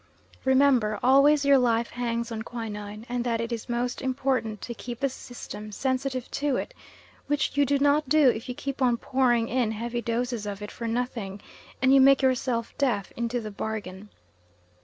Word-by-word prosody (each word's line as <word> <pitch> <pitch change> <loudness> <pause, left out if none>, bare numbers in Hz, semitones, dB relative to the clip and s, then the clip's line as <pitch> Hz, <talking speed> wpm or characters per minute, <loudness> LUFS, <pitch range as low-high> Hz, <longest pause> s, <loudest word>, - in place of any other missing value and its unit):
Remember 260 -6 +3
always 280 +3 +5
your 280 -1 +6
life 235 -1 +1
hangs 235 -1 -2
on 220 -1 -4
quinine, 215 -2 -6
and 245 0 -2
that 235 -2 0
it 230 +1 -3
is 235 +1 -5
most 240 +1 -2
important 255 -5 -1
to 240 - -5
keep 235 +1 -7
the 275 0 +1
system 225 -4 -9
sensitive 260 +2 -2
to 285 -2 0
it, - - -3 0.5
which 290 -1 0
you 285 -1 +3
do 285 +1 +3
not 285 0 +2
do 305 -1 +5
if 230 +1 -3
you 250 - -3
keep 275 +1 -5
on 245 -2 +3
pouring 240 -3 +1
in 245 -3 0
heavy 235 +2 -3
doses 235 -1 -2
of 205 0 -5
it 210 - -7
for 230 - -5
nothing 225 -4 -3 0.4
and 260 +1 +5
you 275 - +7
make 270 0 +6
yourself 250 -3 0
deaf 225 -9 0
into 235 +1 -1
the 215 -2 -6
bargain. 205 -1 -5
245 Hz, 180 wpm, -26 LUFS, 225-265 Hz, 0.5 s, you